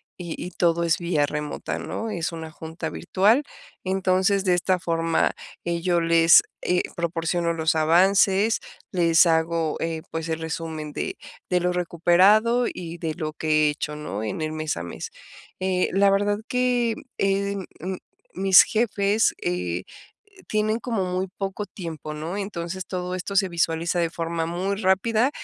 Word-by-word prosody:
y 175 -3 -6
y 180 - -7
todo 170 -1 +1
es 165 0 +2
vía 170 -4 +1
remota, 150 0 -4
¿no?, 225 0 -4
es 170 -4 -2
una 160 -1 -7
junta 160 +1 -6
virtual, 215 +9 +2 0.4
entonces 190 +1 +1
de 180 - +4
esta 180 +1 +2
forma, 165 -1 +1 0.3
eh, 170 0 -1
yo 175 -1 +2
les, 165 0 +6 0.2
eh, 180 0 +1
proporciono 170 0 -1
los 160 -1 +1
avances, 190 +6 +4 0.3
les 170 -2 +5
hago, 165 -1 +1
eh, 165 -1 -3
pues 160 0 -4
el 160 0 -2
resumen 160 -2 -5
de 385 0 -4 0.3
de 180 - +2
lo 180 0 +1
recuperado 185 +8 +3
y 170 -1 -7
de 160 -2 -3
lo 155 -1 -4
que 155 -1 +2
he - - +4
hecho, 150 0 -4
¿no?, 130 -9 -5
en 110 +8 -3
el 155 - -2
mes 155 0 -3
a - - -4
mes, - - -6 0.5
eh, 185 -1 +1
la 195 +1 +4
verdad 205 +1 +2
que, 250 -2 +1 0.2
eh, 200 0 0 0.8
mis 190 0 +7
jefes, 215 -1 +1
eh, 90 0 -2 0.6
tienen 215 +1 0
como 230 -5 -2
muy 185 +1 -2
poco 195 +1 -3
tiempo, 160 -4 -7
¿no?, 160 +5 -4
entonces, 185 -2 -4
todo 180 -1 -4
esto 185 +2 -5
se 195 -1 +3
visualiza 170 0 0
de 170 -1 +1
forma 165 0 -3
muy 185 +4 -2
rápida, 215 +5 +2
175 Hz, 160 wpm, -24 LUFS, 165-195 Hz, 0.8 s, mis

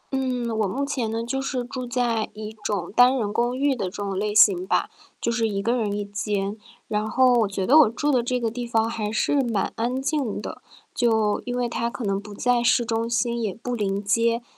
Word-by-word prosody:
嗯， 250 -3 -1
我 210 - +2
目 275 +9 -2
前 260 -6 -2
呢， 225 +1 -2
就 270 +3 -2
是 265 -2 -2
住 250 0 -6
在 240 -3 0
一 215 0 -7
种 190 -5 -2
单 250 +2 +6
人 210 -4 -2
公 240 +2 0
寓 280 0 +2
的 205 - -3
这 - - -2
种 195 -1 -3
类 210 0 -2
型 185 -3 +5
吧， - - +1 0.3
就 235 - -1
是 230 -1 0
1 200 -1 -2
个 235 +2 +1
人 220 -4 -1
1 205 0 -2
间。 205 0 -2 0.3
然 210 +1 -1
后 255 +2 +4
我 230 -4 +3
觉 195 -1 -3
得 290 +8 +7
我 280 -8 +6
住 290 +6 -1
的 255 -3 +3
这 250 +1 -1
个 230 -2 -1
地 240 +1 -5
方 225 -1 +1
还 220 -2 -3
是 275 +6 +2
蛮 230 -6 -1
安 245 +3 -1
静 270 -5 -1
的， - - -7 0.3
就 220 -4 +1
因 245 0 -2
为 245 -1 0
它 235 0 -2
可 240 - -7
能 195 -1 -1
不 210 0 -11
在 245 +2 +2
市 240 0 +3
中 230 0 -1
心， 235 0 0
也 210 -5 -2
不 245 +2 -5
临 200 -3 -1
街。 230 +3 +1
230 Hz, 245 characters per minute, -24 LUFS, 210-245 Hz, 0.3 s, 得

